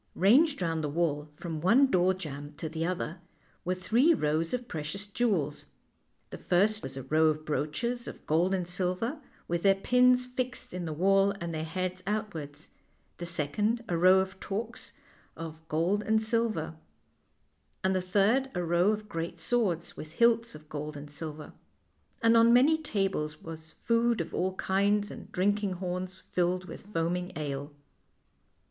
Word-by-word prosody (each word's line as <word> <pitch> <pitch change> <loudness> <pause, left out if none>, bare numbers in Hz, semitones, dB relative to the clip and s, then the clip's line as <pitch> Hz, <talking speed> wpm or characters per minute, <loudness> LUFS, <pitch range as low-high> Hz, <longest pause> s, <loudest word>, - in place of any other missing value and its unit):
Ranged 255 - +4
round 165 -2 -1
the 150 - -1
wall, 150 -1 0
from 155 +1 -6
one 235 - +6
door 185 -1 +3
jamb 145 -4 -7
to 160 - -4
the 160 +1 -3
other, 180 -1 -3 0.4
were 185 0 0
three 240 - +3
rows 155 - 0
of 245 -1 -3
precious 160 +5 -4
jewels. 200 -9 -1 0.6
The - - -7
first 210 +5 +2
was - - -7
a 135 - -5
row 155 +4 +3
of 155 0 0
brooches 195 - -2
of - - -9
gold 170 +4 +2
and 180 -2 -2
silver, 185 - -2 0.3
with 170 0 -1
their 195 0 +5
pins 250 +4 +4
fixed 250 -3 -4
in 180 -1 -4
the 160 - -3
wall 195 +5 +3
and 170 -1 -4
their 155 0 -2
heads 185 +3 -3
outwards; 165 -9 -4 0.5
the 175 - -3
second 205 +9 0
a 175 - -1
row 185 +3 +6
of 190 0 -1
torques 220 +4 -5 0.4
of 160 -1 -7
gold 170 +7 +1
and 220 +1 +2
silver; 220 -8 -1 1.1
and 190 0 +2
the 185 - +1
third 210 +8 +2
a 180 - 0
row 175 +3 +3
of 215 0 -1
great 165 -1 -4
swords, 185 -2 0
with 155 0 -9
hilts 235 -2 +3
of 155 0 -13
gold 150 0 -5
and 145 0 -9
silver. 150 0 -7 0.7
And 230 0 +5
on 230 0 +6
many 290 +6 +5
tables 195 - -2
was 160 -1 -9
food 235 -1 +2
of 165 - -4
all 185 +1 -1
kinds, 200 +2 +1
and - - -10
drinking 205 +1 +1
horns 185 +1 -5
filled 180 +1 +1
with 195 - -10
foaming 180 -1 -2
ale. 145 -1 -4
185 Hz, 165 wpm, -29 LUFS, 160-215 Hz, 1.1 s, one